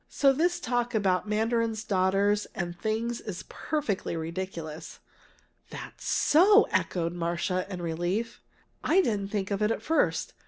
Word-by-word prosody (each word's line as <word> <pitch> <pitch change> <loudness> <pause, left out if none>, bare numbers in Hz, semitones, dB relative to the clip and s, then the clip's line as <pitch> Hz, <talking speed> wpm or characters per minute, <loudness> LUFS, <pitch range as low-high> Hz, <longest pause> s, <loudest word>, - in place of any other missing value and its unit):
So 275 -1 +4
this 350 +5 +1
talk 245 -4 -1
about 195 -1 +1
mandarin's 225 0 0
daughters 200 +2 +2
and 175 -2 -3
things 225 +4 -2
is 195 -5 -6
perfectly 280 - -2
ridiculous!" 165 -1 -6 0.7
"That's - - -9
so!" 400 +8 +5
echoed 170 -1 0
Marcia, 175 +2 -2
in 180 -2 -5
relief. 175 +8 -2 0.4
"I 365 +5 +4
didn't 205 - -1
think 200 -2 -2
of 200 +1 -1
it 210 - +3
at 225 - -2
first. 320 +1 +1
205 Hz, 140 wpm, -28 LUFS, 180-235 Hz, 0.7 s, so